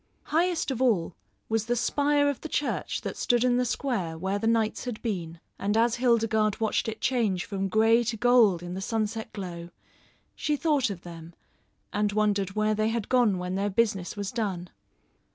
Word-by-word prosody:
Highest 335 -2 +1
of 260 -1 -3
all 205 -10 +1 0.3
was 220 0 -1
the 240 - +1
spire 285 +4 +2
of 285 -2 -2
the 315 - -6
church 290 - -2
that - - -5
stood 240 -1 +1
in 245 -1 +3
the 250 - +1
square 230 -10 -2
where 190 +4 -2
the 225 - -1
knights 225 0 +1
had 245 -3 -4
been; 170 -7 -3 0.2
and 205 +2 0
as 235 +1 +3
Hildegarde 225 -4 +2
watched 220 0 0
it 220 - -6
change 215 -9 0
from 195 0 -2
grey 225 +4 +4
to 225 0 -2
gold 225 -7 +4
in 175 0 -6
the 190 - -4
sunset 220 +1 -2
glow, 175 -4 -7 0.6
she 300 - -1
thought 290 -5 +1
of 190 -4 -7
them 170 -1 -10 0.6
and 205 0 0
wondered 205 -2 +1
where 215 0 +2
they 215 +1 +1
had 225 -2 -3
gone 240 -7 +3
when 180 0 -4
their 200 +2 0
business 200 -3 0
was 200 -1 -3
done. 195 -7 -3
215 Hz, 190 wpm, -27 LUFS, 195-240 Hz, 0.6 s, grey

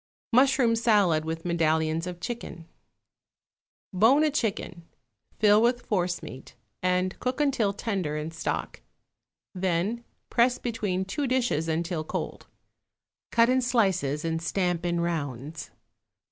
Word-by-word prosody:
=Mushroom 255 -2 +4
Salad 205 -9 +3
with 165 +1 -4
Medallions 160 -1 +1
of 175 -1 -6
Chicken.= 180 -6 -6 1.3
Bone 230 +11 +5
a 310 - +2
chicken, 210 - -2 0.6
fill 210 0 +5
with 245 +1 +1
forcemeat, 175 - -3 0.3
and 185 0 0
cook 255 +2 -2
until 270 -8 +2
tender 195 -8 -2
in 155 +2 -4
stock; 165 - -4 0.7
then 190 +5 -1 0.3
press 245 +1 +3
between 205 -6 -2
two 270 +9 -2
dishes 240 - 0
until 165 0 -1
cold. - - -5 0.8
Cut 230 0 +5
in 255 +1 +3
slices 190 - +1
and 165 0 -1
stamp 175 +1 -1
in 170 0 0
rounds. 150 -3 -4
185 Hz, 120 wpm, -27 LUFS, 165-235 Hz, 1.3 s, Bone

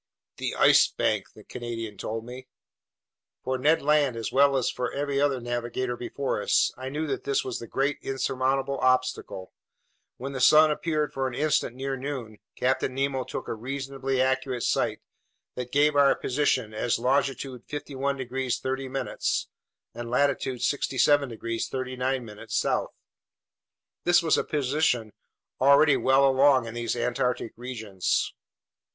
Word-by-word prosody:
"The - - -3
Ice - - +6
Bank!" - - -1
the - - -14
Canadian 115 -3 -6
told 110 +2 -5
me. 125 +1 -9 1.0
For 130 0 -2
Ned 150 +4 +3
Land, 145 -4 +3
as 115 -2 -3
well 140 0 +4
as 130 - 0
for 125 -1 -3
every 140 0 -2 0.2
navigator 120 +1 -3
before 125 -1 -3
us, - - +2
I 130 +1 -6
knew 150 +3 -3
that 145 - -3
this 140 -1 0
was 130 -2 -3
the 115 - -8
great 140 +4 -1
insurmountable 135 +1 -1
obstacle. 130 -7 0 0.6
When 135 +3 -5
the 135 -2 -4
sun 155 +4 +7
appeared 150 -1 -1
for 135 -1 -1
an 125 - -5
instant 150 -4 +1
near 135 +1 -3
noon, 130 -5 -6 0.2
Captain 130 0 0
Nemo 135 -1 0
took - - -6
a - - -2
reasonably 135 +2 -3
accurate 130 -1 0
sight - - 0 0.5
that 125 -1 -6
gave 145 +1 +3
our 140 -1 +5
position 130 -5 0
as 115 +2 0
longitude 130 0 -1
51 140 -1 -3
degrees 130 -1 -2
30' 130 0 -3 1.0
and 120 0 -6
latitude 130 -1 0
67 140 0 +2
degrees 115 0 -3
39' 130 -4 -3
south. - - 0 1.1
This 175 -1 +4
was 160 - +3
a - - +1
position 135 -6 0 0.5
already 140 +2 +6
well 135 +1 +4
along 135 -1 +4
in 115 - -7
these 120 0 -2
Antarctic 120 -1 -1
regions. 110 -7 -2
130 Hz, 145 wpm, -26 LUFS, 125-140 Hz, 1.1 s, sun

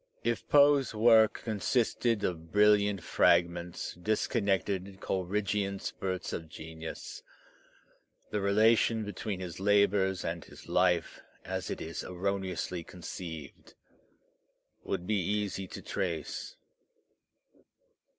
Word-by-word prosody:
If - - -1
Poe's 140 -4 +5
work 110 0 +5
consisted 115 0 0
of 80 -2 -3
brilliant 105 -3 +4
fragments, 85 0 +2
disconnected 100 -1 -1
Coleridgean 100 +1 -1
spurts 95 -1 -4
of 80 -1 -5
genius, 80 +1 -8 1.1
the 105 - -1
relation 110 +2 +3
between 100 -1 -4
his 90 -1 -6
labours 100 -1 +3
and 85 0 -3
his - - -14
life, 90 -2 +1 0.2
as - - -3
it - - -3
is 80 +1 -5
erroneously 90 -1 -3
conceived, 80 -3 -8 1.1
would 90 - -3
be 105 +1 +1
easy 100 0 -2
to - - -9
trace. 85 -5 -3
95 Hz, 100 wpm, -31 LUFS, 90-105 Hz, 1.1 s, Poe's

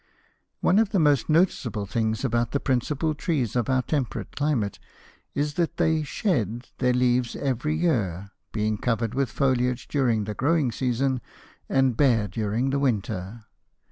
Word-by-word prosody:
One 195 - +4
of 220 -3 +3
the 205 - 0
most 145 -4 +3
noticeable 150 - +1
things 110 +4 -1
about 120 -1 0
the 140 - +2
principal 140 +5 0
trees 140 - -1
of 120 0 0
our 130 -1 +2
temperate 135 -6 -3
climate 140 -9 0 0.6
is 145 +1 0
that 165 - -1
they 160 -1 +2
"shed" 125 - -1
their 125 -1 +3
leaves 125 -1 +1
every 140 +3 -1
year, 105 - 0 0.2
being 110 -1 -1
covered 115 -1 -1
with 135 -1 0
foliage 125 0 0
during 120 -7 +1
the 105 +1 -4
growing 145 +1 +1
season 130 +2 0 0.5
and 135 -3 +2
bare 115 -6 +3
during 110 +6 -1
the 140 - +1
winter. 110 -4 -2
125 Hz, 150 wpm, -25 LUFS, 110-145 Hz, 0.6 s, One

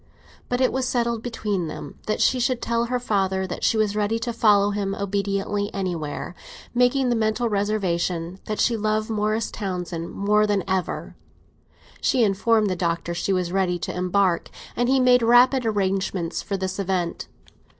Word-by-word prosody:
But 245 +1 0
it 255 - +3
was 260 -1 0
settled 235 -2 0
between 210 -7 -2
them - - -8
that 215 - 0
she 255 - +3
should 245 0 +1
tell 235 0 0
her 250 +1 -1
father 195 -5 0
that 180 - -6
she 225 - +3
was 210 -1 +1
ready 210 +1 +1
to 235 +1 -3
follow 205 -3 +4
him 200 -1 -2
obediently 200 +1 -1
anywhere, 175 -5 -3 0.4
making 250 +1 +3
the 240 - +2
mental 220 +2 +1
reservation 185 -4 -1
that 215 - -3
she 235 - +3
loved 215 0 -1
Morris 215 +1 0
Townsend 180 -4 -4
more 210 +1 +2
than 205 -3 +1
ever. 190 -1 -2 0.9
She 250 - +3
informed 215 +2 +2
the 185 - 0
Doctor 170 -1 -1
she 175 +3 -1
was 180 -2 0
ready 185 -2 +1
to - - -5
embark, 180 -1 +1 0.3
and 245 +1 +1
he 265 0 +4
made 250 -1 +5
rapid 245 +2 +5
arrangements 195 -4 -1
for 200 - -3
this 190 +1 -3
event. 185 -3 -2
205 Hz, 170 wpm, -24 LUFS, 190-230 Hz, 0.9 s, made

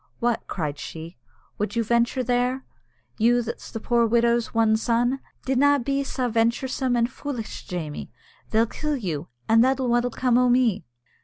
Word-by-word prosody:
"What!" 235 -1 0
cried 150 -5 -3
she, 165 +2 -8 0.4
"would 210 +3 -2
you 230 - +2
venture 235 +3 +1
there? 250 +2 0 0.5
you 240 +2 +3
that's 230 - -7
the 225 - -5
poor 235 +1 +2
widow's 235 0 +2
one 225 -1 +3
son! 240 +4 +1 0.3
Dinna 285 +2 +4
be 275 +2 -1
sae 260 -2 -2
venturesome 245 +3 0
an' 235 -1 +3
foolitch, 255 -2 -6
Jamie! 160 -5 -5 0.4
They'll 225 +1 +3
kill 300 +5 -3
you, 170 - -4 0.2
an' 225 +1 +5
then 260 +2 +4
what'll 245 -1 +1
come 245 0 +2
o' 250 0 +3
me?" 240 -8 +2
235 Hz, 160 wpm, -24 LUFS, 225-255 Hz, 0.5 s, an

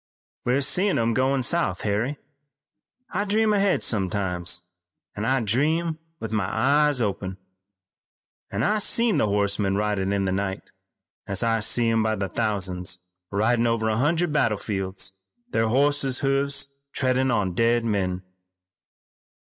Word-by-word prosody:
"We're 125 +3 +2
seein' 185 +8 +2
'em 115 0 +1
goin' 130 +1 +1
south, 120 - +1
Harry. 110 +8 -1 0.9
I 195 +2 0
dream 215 +1 +2
ahead 200 -1 +2
sometimes, 90 -4 0 0.5
an' 105 - -3
I 130 +2 +2
dream 155 - 0 0.2
with 110 -1 -5
my 105 -4 0
eyes 145 -2 +2
open. 95 -2 -3 1.1
I've 210 +1 +1
seen 230 -6 +3
the 110 - +2
horsemen 100 -1 +1
ridin' 100 -2 0
in 100 -1 0
the 95 - 0
night, 95 0 -3 0.6
an' 100 - -3
I 115 -1 +2
see 115 +2 +2
'em 115 0 +2
by 110 0 +1
the 95 -2 -3
thousands 95 -4 -1 0.3
ridin' 115 +4 +2
over 115 -1 +1
a 110 - 0
hundred 160 +5 +1
battle 115 -8 +2
fields, 95 -2 -4 0.3
their 115 - +1
horses' 135 +1 +2
hoofs 140 0 0
treadin' 130 0 +1
on 105 -6 0
dead 115 +3 +2
men." 95 -4 -1
115 Hz, 140 wpm, -24 LUFS, 100-140 Hz, 1.1 s, seen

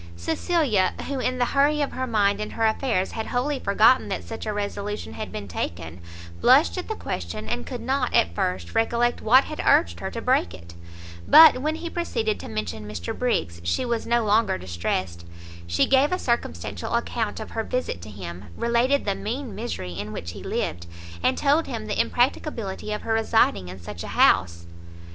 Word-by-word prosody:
Cecilia, 205 - +1
who, 275 -1 -3
in 255 0 -1
the 245 - +2
hurry 285 +4 +2
of 285 - 0
her 260 0 -3
mind 205 -3 +2
and 210 - -5
her 225 - 0
affairs, 220 -4 0
had 220 - -4
wholly 265 +3 -1
forgotten 215 +5 +4
that - - -3
such 225 0 -7
a - - 0
resolution 205 0 -4
had 215 - -6
been 100 - -6
taken, 85 -1 -5 0.4
blushed 85 0 +5
at - - -6
the - - -3
question, 85 +4 -5
and 80 -6 -3
could - - -5
not, 260 0 0
at 85 - +3
first, 90 0 -2
recollect 235 +1 +1
what 255 +5 +6
had 305 - -5
urged 85 0 +3
her - - -4
to - - -5
break 85 - +1
it; 85 -1 -13 0.5
but 320 -5 +9
when 310 +2 0
he 335 +1 -6
proceeded 230 -11 -2
to - - -8
mention 105 0 -4
Mr 95 -5 -5
Briggs, 85 - -1
she 85 +1 0
was 235 -2 -2
no 235 -1 +2
longer 215 - +2
distressed; 85 -1 -3 0.4
she 85 - +2
gave 270 +3 +3
a 365 - +1
circumstantial 105 - -2
account 230 -2 -2
of 220 - -7
her 225 - -2
visit 250 - -3
to 95 - -9
him, 90 -2 -8
related 240 +4 +2
the 200 - +1
mean 235 +4 -5
misery 205 - -5
in 100 +4 -5
which 85 -5 -6
he - - -10
lived, 85 -1 -3 0.3
and - - +2
told 295 +3 +2
him 225 -4 -5
the 210 - +1
impracticability 235 -5 -1
of 210 - -3
her 225 - -1
residing 220 - +2
in 90 +1 -9
such 85 -1 -8
a - - -6
house. 85 -1 +3
215 Hz, 195 wpm, -24 LUFS, -, 0.5 s, but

